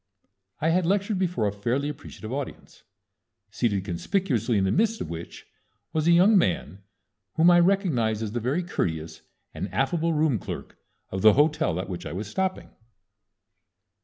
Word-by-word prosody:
I 160 - +1
had 170 0 +2
lectured 200 +1 +1
before 180 - 0
a - - 0
fairly 120 +8 -1
appreciative 125 -5 -7
audience, 140 -1 -7 0.7
seated 100 -5 -1
conspicuously 120 - 0
in 95 - +2
the 95 - +1
midst 225 +3 +1
of - - -5
which 85 0 -8 0.5
was 155 0 0
a - - +6
young 185 +6 +6
man 95 - -1 0.5
whom 170 +2 +6
I 175 - +6
recognized 155 - +2
as 105 - -4
the 120 - -2
very 135 +10 -1
courteous 80 - -3 0.3
and 95 - -5
affable 160 - 0
room 150 -7 +2
clerk - - -7 0.4
of 95 - -3
the 110 +1 +7
hotel 145 - +2
at 95 - -4
which 90 -2 -6
I - - -6
was 100 +4 -4
stopping. 190 - -3
135 Hz, 160 wpm, -26 LUFS, -, 0.7 s, the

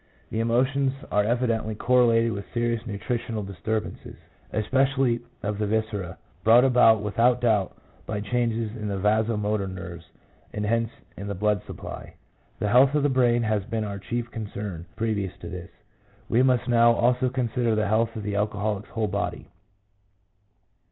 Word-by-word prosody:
The 110 - -2
emotions 130 +4 +2 0.2
are 105 - +3
EMOTIONS. 120 +4 +1
143 120 -2 +2
evidently 110 -1 -3
correlated 115 -1 +3
with 100 -1 -6
serious 120 0 -1
nutritional 110 +1 -3
disturb 105 +3 -2
ances, - - -10 0.4
especially 130 +2 +1 0.2
of 105 0 -2
the 105 - 0
viscera, 105 -4 -2 0.3
brought 115 +3 +7
about 115 -4 +5
without 120 +4 +2
doubt 110 -6 +1 0.3
by 105 -1 -2
changes 115 0 -1
in 105 -3 -5
the 100 -1 -2
vasomotor 105 0 +1
nerves, 95 -3 -8 0.5
and 105 0 -2
hence 115 +1 +1 0.3
in 100 - -7
the 100 - -3
blood 105 0 +1
supply. - - -8 0.4
The 105 - -1
health 130 +5 +5
of 150 - +2
the 145 - +3
brain 120 -2 +3
has 110 -2 0
been 115 -1 -2
our 100 -1 -5
chief 120 +4 -4
concern 100 -5 -6
previous 110 -4 -2
to 85 - -8
this; 90 -2 -7 0.6
we 115 - +3
must 130 -1 +2
now 120 -1 +5
also 125 +2 +2
consider 120 -2 0
the 110 -1 +1
health 115 +2 +1
of 110 - -5
the 100 0 -3
alcoholic's 105 0 -1
whole 110 -2 -1
body. - - -3
110 Hz, 165 wpm, -25 LUFS, 105-120 Hz, 0.6 s, brought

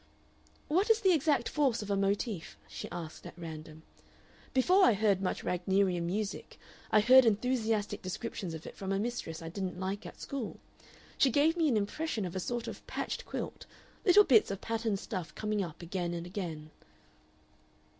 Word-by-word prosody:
"What 370 +8 +2
is 450 0 +5
the 380 -4 +5
exact 300 -2 +2
force 265 -7 +1
of 205 - -5
a - - +3
motif?" 195 - -1
she 80 0 -7
asked 165 -2 -7
at - - -12
random. 160 -2 -8 0.7
"Before 360 +9 +4
I 240 - +7
heard 200 -2 +2
much 190 - -2
Wagnerian 180 -1 +1
music 205 +3 -3 0.3
I 215 - +5
heard 255 +4 +8
enthusiastic 225 -1 +1
descriptions 185 -2 -4
of 160 - -9
it - - -9
from 195 0 -4
a 195 - +1
mistress 200 -7 -3
I 165 - -5
didn't 180 0 -4
like 190 +2 -3
at - - -12
school. 270 -6 -5 0.6
She 270 - +6
gave 295 +6 +3
me 330 -2 +2
an 245 -6 +3
impression 215 +2 -2
of 180 0 -6
a - - 0
sort 240 +5 -3
of - - -7
patched - - -4
quilt; - - -5 0.4
little 410 +1 +7
bits 240 - +5
of 195 -1 -3
patterned 225 -2 -1
stuff 180 -5 -5
coming 210 -2 -1
up 170 -1 -8
again 175 0 -2
and 170 0 -5
again." 165 -5 -5
200 Hz, 175 wpm, -31 LUFS, 180-245 Hz, 0.7 s, heard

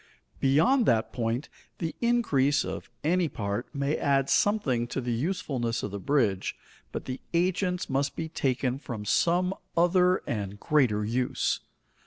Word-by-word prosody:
Beyond 215 - +4
that 110 -1 +2
point, 120 +3 -1 0.3
the 165 -1 -3
increase 155 - +2
of - - -6
any 170 +1 +2
part 100 0 -3
may 140 +2 -1
add 140 -1 +1
something 135 - +2
to 125 - -3
the 120 -2 -2
usefulness 125 -5 -2
of 105 - -3
the 100 - -4
bridge, 115 -7 +1 0.4
but - - -5
the 130 0 -5
agents 180 +1 +1
must 140 +1 0
be 160 - -3
taken 130 -4 -1
from 115 -7 -6
some 175 - +2 0.2
other 180 +1 +4
and 105 -2 -4
greater 120 -9 +2
use. 125 +3 0
140 Hz, 145 wpm, -28 LUFS, 120-175 Hz, 0.4 s, Beyond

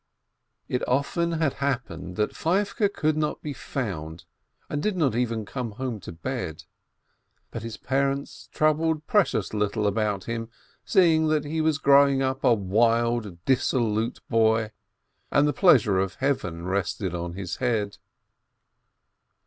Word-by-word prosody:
How 125 - -1
often 165 +6 0
it - - -1
had 155 -4 +2
happened 115 -11 -3
that 105 0 -1
Feivke 200 +4 +1
could 155 -5 0
not 155 -1 -2
be 150 - -4
found, 85 - -5 0.4
and 145 - -3
did 210 +1 -1
not 145 -9 +2
even 115 -2 -1
come 120 0 -5
home 125 -1 -4
to 90 - -9
bed! 85 - -5 0.9
But 115 - -5
his 115 -1 -6
parents 140 +1 -2
troubled 155 0 +1
precious 205 - +1
little 105 0 0
about 105 -1 0
him, 115 -1 -4 0.3
seeing 160 -4 +4
that 155 -1 +1
he 160 +2 -1
was 155 -2 +2
growing 140 -1 +5
up 130 +1 -2
a - - +5
wild, 115 -1 +1
dissolute 120 -3 +1
boy, 110 -1 +2 0.6
and 145 +1 +4
the - - +2
dis - - -13
pleasure 110 - +5
of 95 -1 -1
Heaven 90 -12 -2
rested 95 -1 -2
on 85 0 -4
his 90 -2 -5
head. 110 -5 -1
120 Hz, 145 wpm, -26 LUFS, 105-145 Hz, 0.9 s, growing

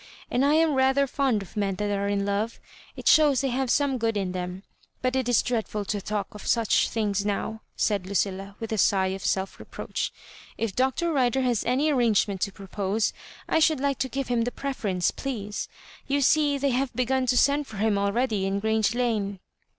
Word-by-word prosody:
And 250 - +2
I 290 +2 +4
am 320 -1 +3
rather 265 +1 +3
fond 260 -6 0
of 190 - -16
men 200 -2 0
that 205 +1 -2
are 200 0 -1
in 200 0 0
love— 205 +3 -1 0.4
4t - - -5
shows 295 -4 +5
they 270 - 0
have 260 +1 -1
some 275 -1 +2
good 225 -1 0
in 190 -2 -1
them. 180 +1 -5 0.4
But 255 0 +1
it 260 -2 0
is 245 - +4
dreadful 215 -4 -2
to 205 0 -2
talk 205 0 -3
of 210 - -9
such 230 -3 +3
things 205 -3 0
now," 210 +2 -2
said 200 -4 0
Lucilla, 195 0 -2
with 225 -1 -5
a 220 - 0
sigh 190 0 +3
of 190 0 -5
self 190 0 -1
reproach. - - -4 0.2
" - - -20
If 225 -4 -2
Dr. 265 +6 +1
Rider 265 -2 +2
has 245 -4 +1
any 275 +6 +2
arrange 235 -7 +3
ment 195 -2 -5
to 200 - 0
propose, 200 +2 -2 0.3
I - - +2
should 315 -2 +3
like 280 -1 0
to 260 - -1
give 275 +1 -3
him 240 -1 +1
the 235 - 0
preference^ 210 -10 -2
please. 210 -6 -4 0.4
You 280 +1 +1
see 290 +1 +3
they 280 0 +1
have 255 +1 0
begun 255 +1 +1
to 250 - +2
send 285 +2 +3
for 215 - -9
him 215 0 +2
already 200 0 0
in 195 +1 -1
Grrange 220 +1 +1
Lane." 215 -5 -1
225 Hz, 210 wpm, -26 LUFS, 200-265 Hz, 0.4 s, shows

